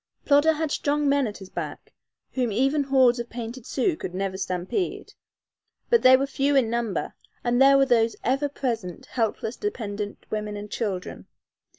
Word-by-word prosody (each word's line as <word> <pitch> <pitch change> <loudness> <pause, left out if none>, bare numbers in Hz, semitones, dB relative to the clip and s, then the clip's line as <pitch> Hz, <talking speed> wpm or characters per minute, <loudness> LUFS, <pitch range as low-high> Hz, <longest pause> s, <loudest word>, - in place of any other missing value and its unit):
Plodder 290 +2 +5
had 310 -1 -2
strong 295 0 0
men 280 -2 +3
at 210 - -6
his 190 -1 -12
back, - - -6 0.4
whom 250 -4 -1
even 270 +6 +1
hordes 260 -3 +4
of 235 0 -5
painted 235 +1 -7
Sioux 305 +6 0
could 180 - -6
never 190 0 -2
stampede, 185 - -3 0.8
but 470 - +5
they 260 0 +8
were 275 - 0
few 280 +1 0
in 245 -5 +3
number, 235 -4 -2 0.3
and 245 +1 +2
there 275 0 +7
were 275 - +5
those 230 -3 +2
ever 275 +4 +1
present 230 - -4
helpless, 225 0 -2
dependent 210 - -4
women 210 -1 -3
and 205 0 -8
children. 195 -6 -4
245 Hz, 170 wpm, -25 LUFS, 210-275 Hz, 0.8 s, they